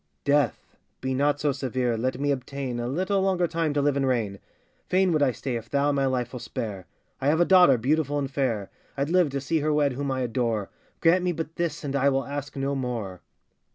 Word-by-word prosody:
Death, 145 -4 +1 0.2
be 130 0 -2
not 145 +2 +1
so 150 -1 +1
severe, 130 -3 -1
let 125 +3 -2
me 145 0 +1
obtain 135 -2 -3
A 120 - -2
little 185 +8 0
longer 190 -2 +2
time 165 -2 -1
to 145 - +2
live 145 -1 +2
and 135 -1 +1
reign! 110 -6 -1 0.5
Fain 185 0 +3
would 155 -2 +2
I 140 -3 +4
stay 125 0 -3
if 115 0 -9
thou 145 +1 +2
my 140 -1 +1
life 125 -1 -1
will 125 - -5
spare; 100 -7 -5 0.3
I 135 - 0
have 155 +3 +3
a 175 - +5
daughter 180 -9 +6
beautiful 145 +4 +1
and 140 -1 -2
fair, 120 -8 -1 0.3
I'd 140 +3 -1
live 180 -4 +4
to 140 0 -2
see 155 +4 0
her 155 +1 0
wed 145 -2 +2
whom 140 +2 -3
I 130 -1 -1
adore: 115 -4 -1 0.3
Grant 175 +2 +4
me 180 -1 +1
but 160 -1 -5
this 165 -3 -2
and 140 -1 -3
I 140 0 +3
will 135 -1 0
ask 145 +1 -5
no 135 0 -1
more. 120 -9 -4
140 Hz, 225 wpm, -26 LUFS, 125-150 Hz, 0.5 s, daughter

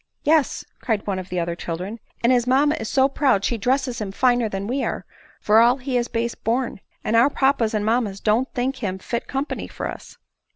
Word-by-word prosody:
" - - -51
Yes," 310 -1 +2 0.2
cried 220 -4 -1
one 195 -2 -1
of 185 - -8
the 180 - -2
other 170 0 -2
children; 180 +7 -5
" - - -34
and 240 +2 +5
his 245 -1 +2
mamma 280 +4 +4
is 220 - -4
so 265 -1 +4
proud 265 -8 +2
she 240 - 0
dresses 255 +1 0
him 200 -2 -3
finer 245 +1 +2
than 195 0 -4
we 260 +5 -1
are, - - -3 0.3
for 215 +1 +4
all 240 +3 +5
he 260 0 -4
is 240 -1 +1
base 235 0 -2
born; 240 -1 -2 0.2
and 215 - 0
our 235 +5 +6
papas 265 -6 +1
and 210 -1 0
mammas 220 -3 0
don't 225 +6 +1
think 260 +2 -1
him 195 -7 -3
fit 235 +5 -4
company 275 +3 -3
for - - -5
us." - - -9
235 Hz, 225 wpm, -23 LUFS, 210-260 Hz, 0.3 s, our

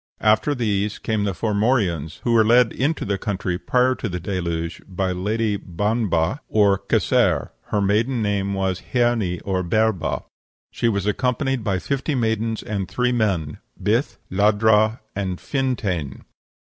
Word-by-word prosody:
After 110 +7 +3
these 105 -4 -1
came 110 -2 -1
the 100 - -1
Formorians, 100 - 0
who 120 - +1
were 115 -1 +5
led 120 +1 +5
into 145 +5 -1
the 100 -1 -1
country 95 -3 -2
prior 125 +3 +2
to 115 - -4
the 90 -1 -3
Deluge 85 -2 -3
by 95 0 -2
the 90 -1 -3
Lady 105 +2 0
Banbha, 105 - 0
or 100 -2 +3
Kesair; - - +1
her 105 - -1
maiden 110 +6 +1
name 100 -2 0
was 95 -1 -1
h'Erni, 120 -8 +1
or 95 -2 0
Berba; 100 -3 0 0.5
she 115 - 0
was 100 -3 -1
accompanied 125 +3 0
by 100 -3 0
fifty 140 - -2
maidens 110 -2 -1
and 100 -3 -3
three 125 0 +1
men 95 -11 0 0.2
Bith, 115 +7 0
Ladhra, 110 +3 +3
and 95 -3 -3
Fintain. 105 - -2
105 Hz, 150 wpm, -22 LUFS, 95-115 Hz, 0.5 s, were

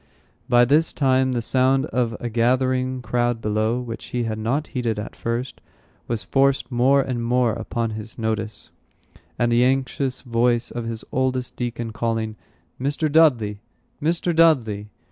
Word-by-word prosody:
By 120 0 +6
this 150 +6 +2
time 130 -2 +2
the 120 -2 -1
sound 130 +2 +2
of 120 -6 -1
a 120 - -3
gathering 130 +2 +1
crowd 120 -1 0
below, 110 +2 0
which 115 -3 -6
he 120 -1 -2
had 110 -1 -3
not 130 +8 -1
heeded 120 -4 -1
at 105 - -6
first, 120 +3 -4 0.5
was 115 -2 -2
forced 135 -3 +1
more 135 +3 +4
and 125 -3 -3
more 120 -1 +2
upon 115 0 -3
his 110 +1 -7
notice; 110 -1 -3 0.7
and 120 0 +1
the 120 +1 +4
anxious 130 0 0
voice 120 -1 +1
of 120 -1 -4
his 115 -1 -5
oldest 130 -1 -1
deacon 120 -2 -4
calling, 110 -1 -2 0.5
"Mr. 145 +3 0
Dudley! 120 -10 +3 0.4
Mr. 170 +2 0
Dudley!" 115 -11 +3
120 Hz, 150 wpm, -23 LUFS, 115-130 Hz, 0.7 s, By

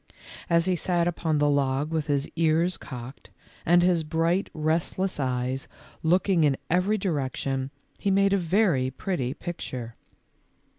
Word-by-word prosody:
As 170 -1 +3
he 185 -1 +2
sat 175 0 +1
upon 160 -2 0
the 145 0 +3
log 140 +1 +1
with 160 -2 -1
his 140 -1 0
ears 165 +2 +2
cocked, 125 +1 -9 0.4
and 175 +1 +5
his 175 -2 +3
bright, 165 +4 0
restless 160 +4 -1
eyes 130 0 -2 0.3
looking 180 +1 +3
in 140 -3 +3
every 185 +5 +2
direction, 135 -6 -2 0.3
he 200 - 0
made 195 0 +3
a - - +4
very 170 -7 +2
pretty 135 -2 -3
picture. 125 -9 -6
160 Hz, 140 wpm, -26 LUFS, 135-180 Hz, 0.4 s, and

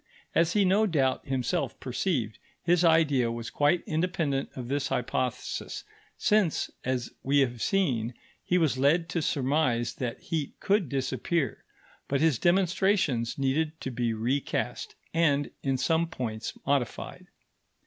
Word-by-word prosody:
As 165 +1 +3
he 205 -2 +4
no 205 +4 +4
doubt 135 -8 +1
himself 130 -1 -1
perceived, 125 - -2 0.2
his 175 +1 +3
idea 150 -8 +4
was 115 0 -5
quite 145 +4 +2
independent 160 -4 -1
of 125 -2 -6
this 140 +1 -1
hypothesis, 125 0 -2 0.3
since, 210 -6 +2
as 125 -2 -2
we 140 +1 +3
have 120 -3 -1
seen, 125 - 0 0.3
he 180 - +2
was 155 -6 +1
led 165 +5 +3
to 170 - -1
surmise 130 -5 +1
that 120 -3 -4
heat 155 -4 -4
could 195 - +1
disappear; 135 +3 -1 0.4
but 140 - 0
his 155 -6 +3
demonstrations 180 - +2
needed 150 +4 0
to 130 - -3
be 120 -1 0
recast 120 +6 -2 0.2
and, 145 -4 +2
in 135 -1 0
some 160 +5 +1
points, 115 -8 -5
modified. 140 -4 -2
140 Hz, 135 wpm, -28 LUFS, 125-165 Hz, 0.4 s, he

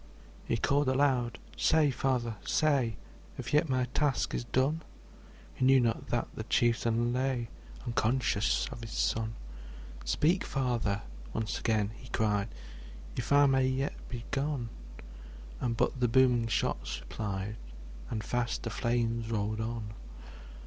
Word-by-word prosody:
He 115 - +1
called 140 +3 +2
aloud, 130 -4 +2 0.2
``Say, 150 -4 +3
Father, 120 -4 0
say, 140 -7 +2 0.4
If - - -5
yet 150 +1 +4
my 130 -1 +2
task 145 -4 +1
is - - -1
done!'' 135 +7 +1 0.7
He - - -3
knew 135 +1 +7
not 115 -3 0
that - - 0
the - - -5
chieftain 120 0 +2
lay 125 -2 0 0.4
Unconscious 115 -2 +1
of 115 - -7
his 115 -3 -7
son. 110 0 0 0.7
``Speak, 155 - +2
Father!'' 120 -7 0 0.3
once 110 -1 -2
again 110 -3 +1
he 125 - -12
cried, 105 -2 +1 0.7
``If 125 - -3
I 145 0 +7
may 135 -1 +4
yet 130 +2 0 0.2
be 120 -1 -6
gone!'' 140 -4 -1 0.9
And 115 -2 -1
but 130 - +1
the 125 - +3
booming 120 -1 +4
shots - - -1
replied, 100 - -4 0.5
And 110 -2 -3
fast 120 0 -1
the 115 - -3
flames 115 -1 0
rolled 110 0 -1
on 110 - -1
on. 110 -3 -5
120 Hz, 140 wpm, -31 LUFS, 115-130 Hz, 0.9 s, knew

